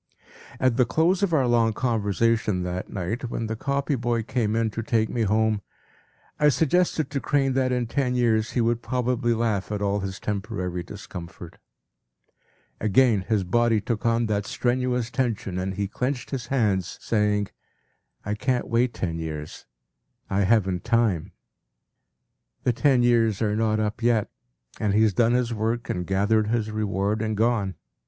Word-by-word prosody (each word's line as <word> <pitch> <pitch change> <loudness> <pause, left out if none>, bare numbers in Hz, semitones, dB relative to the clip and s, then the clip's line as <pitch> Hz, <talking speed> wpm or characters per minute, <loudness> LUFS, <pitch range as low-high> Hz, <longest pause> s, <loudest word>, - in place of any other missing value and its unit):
p> - - -35 0.3
At 130 -2 +2
the 125 - +4
close 165 - +2
of 200 -3 +1
our 145 -5 +3
long 115 -2 +3
conversation 110 -4 +1
that 90 +1 -4
night, 110 +6 -3
when 115 - -3
the 110 0 -3
copy 140 +5 -1
boy 120 -2 0
came 110 -2 -1
in 115 -1 +1
to 115 - -4
take 110 0 +1
me 120 - -2
home, 110 0 +2 0.8
I 150 - +5
suggested 160 0 +1
to 140 - -1
Crane 135 -1 +1
that 130 -1 +1
in 125 -1 0
ten 125 +1 -1
years 115 -3 +1
he 125 - +1
would 115 +1 +1
probably 125 -2 0
laugh 110 -4 -1
at 105 - -1
all 100 0 0
his 95 0 -5
temporary 100 -4 -3
discomfort. 85 -2 -9 1.2
Again 110 0 +3
his 105 -3 +1
body 115 +3 +2
took 110 +1 -3
on 115 0 +2
that 105 -2 -1
strenuous 125 -1 -1
tension 115 -7 -1
and 95 +1 -3
he 100 0 -1
clenched 125 +5 -3
his 130 -4 -4
hands, 105 -9 0
saying, 105 -2 0 0.8
“I 105 - -1
can’t 125 +4 -1
wait 120 +1 +1
ten 85 -3 -3
years, 75 -2 -6 0.6
I 95 0 +2
haven’t 95 -4 +2
time.” 115 -8 +1 1.3
The 125 - +2
ten 130 -1 +3
years 115 -4 +3
are 105 -2 0
not 110 -1 +1
up 110 +1 -2
yet, 115 -3 +2 0.5
and 105 -2 +1
he 110 - +5
has 110 -2 +3
done 115 +4 +3
his 125 -1 +1
work 115 +2 -1
and 90 -1 -3
gathered 105 +3 +2
his 110 -1 -1
reward 105 0 -1
and 110 -1 -1
gone. 110 -4 +1
115 Hz, 165 wpm, -25 LUFS, 100-120 Hz, 1.3 s, I